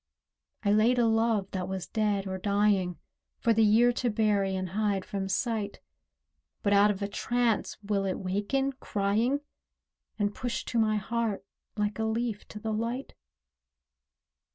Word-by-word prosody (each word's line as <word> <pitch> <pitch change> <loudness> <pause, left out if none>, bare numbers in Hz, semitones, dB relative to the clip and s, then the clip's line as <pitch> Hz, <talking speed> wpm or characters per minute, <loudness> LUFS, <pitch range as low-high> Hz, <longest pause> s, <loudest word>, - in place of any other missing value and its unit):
I 200 - +3
laid 220 +4 +4
a 240 - +4
love 225 -3 +2
that 185 -2 -3
was 190 -1 -4
dead 210 -3 0
or 190 -1 -4
dying, 200 -3 +2 0.4
For 230 - +2
the 225 - +3
year 225 +3 +5
to 245 0 0
bury 210 -3 +1
and 185 -1 -3
hide 200 0 0
from 195 -1 -3
sight; 215 -1 -1 0.8
But 200 - +3
out 200 +1 +6
of 205 -1 -1
a - - 0
trance 240 +2 0
will 200 -1 0
it 190 - -1
waken, 205 +9 -1
crying, 225 +4 0 0.8
And 205 -1 0
push 245 +1 -3
to 235 - -1
my 215 -1 +3
heart, 215 -1 -2 0.3
like 210 +1 -1
a 220 - +1
leaf 220 -1 -2
to 210 - -9
the 220 0 -3
light? 235 +5 -3
210 Hz, 155 wpm, -29 LUFS, 200-230 Hz, 0.8 s, out